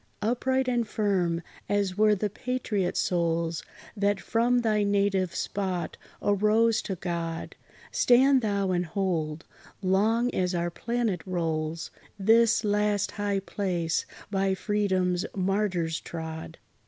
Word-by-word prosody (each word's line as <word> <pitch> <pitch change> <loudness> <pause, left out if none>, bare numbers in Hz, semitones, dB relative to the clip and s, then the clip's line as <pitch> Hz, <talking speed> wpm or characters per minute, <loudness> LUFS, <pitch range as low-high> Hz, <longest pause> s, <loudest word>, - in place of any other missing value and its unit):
Upright 260 +3 +1
and 240 -3 +1
firm, 185 -6 0 0.3
as 200 -2 +1
were 215 +1 +4
the 205 +1 -2
patriot 215 -6 -2
souls, 170 -2 0 0.3
That 205 -1 +1
from 240 +5 +2
thy 215 -2 +2
native 200 -3 +1
spot 185 -3 -2 0.3
arose 215 +3 +3
to 190 - -1
God, 165 -2 -4 0.4
Stand 260 +2 +5
thou 200 -3 0
and 175 -1 0
hold, 165 -4 -2 0.4
long 220 +6 +2
as 180 -1 0
our 170 0 -1
planet 230 -3 -1
rolls, 165 -2 -2 0.3
This 225 +3 +4
last 210 -1 +1
high 205 -1 -1
place 180 -5 -1 0.2
by 195 -1 +1
Freedom's 190 -3 0
martyrs 185 -4 0
trod. 160 -1 -7
195 Hz, 115 wpm, -27 LUFS, 175-215 Hz, 0.4 s, Stand